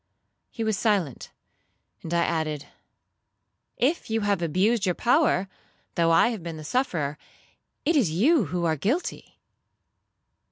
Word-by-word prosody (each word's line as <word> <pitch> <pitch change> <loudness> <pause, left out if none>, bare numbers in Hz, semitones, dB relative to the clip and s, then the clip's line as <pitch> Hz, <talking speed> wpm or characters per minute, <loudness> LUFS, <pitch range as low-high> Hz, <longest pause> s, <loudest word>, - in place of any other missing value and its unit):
'—He 230 - -5
was 220 -3 0
silent, 195 - 0 0.7
and 165 - -7
I 170 0 +2
added, 155 -3 -2 1.1
'If 280 +4 0
you 225 0 0
have 200 -3 0
abused 195 +7 +1
your 180 -4 +1
power, 245 - +2 0.5
though 165 -1 +2
I 165 +8 +5
have 225 -6 -4
been 165 -1 -6
the 155 - -8
sufferer, 155 - -1 0.7
it 330 - +2
is 250 - +3
you 235 - +3
who 170 +2 -2
are 160 -1 +2
guilty.' 230 - -3
185 Hz, 135 wpm, -26 LUFS, 165-235 Hz, 1.1 s, I